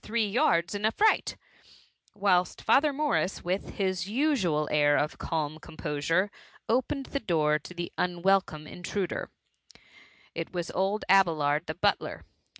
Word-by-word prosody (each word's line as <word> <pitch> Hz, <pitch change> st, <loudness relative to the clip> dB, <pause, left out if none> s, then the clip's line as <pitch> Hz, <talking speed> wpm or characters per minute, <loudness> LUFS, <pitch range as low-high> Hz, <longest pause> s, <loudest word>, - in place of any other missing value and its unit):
• -, -, -41 dB
three 215 Hz, -2 st, -1 dB
jards 180 Hz, -, +2 dB
in 205 Hz, 0 st, -4 dB
a 220 Hz, -, +4 dB
fright: 430 Hz, -, +2 dB, 0.4 s
— -, -, -34 dB
^t^hilst 185 Hz, -3 st, +2 dB
Father 295 Hz, +2 st, +3 dB
Morris, 280 Hz, -9 st, -1 dB
with 185 Hz, +3 st, -3 dB
his 185 Hz, -2 st, -1 dB
usual 210 Hz, -, +1 dB
air 145 Hz, -1 st, +4 dB
of 150 Hz, -, -1 dB
calm 155 Hz, -1 st, -2 dB
composure, 165 Hz, +5 st, -1 dB, 0.4 s
opened 260 Hz, +3 st, 0 dB
the 280 Hz, -, -1 dB
door 155 Hz, -, +1 dB
to 155 Hz, -, -12 dB
the 175 Hz, 0 st, -5 dB
unweldbme 175 Hz, -3 st, +1 dB
intruder* 180 Hz, +2 st, -4 dB, 1.0 s
It 165 Hz, 0 st, -4 dB
vas 175 Hz, -2 st, -4 dB
old 195 Hz, +3 st, -1 dB
Abelard 155 Hz, -6 st, +3 dB
the -, -, -4 dB
butler. -, -, -1 dB
180 Hz, 145 wpm, -28 LUFS, 160-210 Hz, 1.0 s, a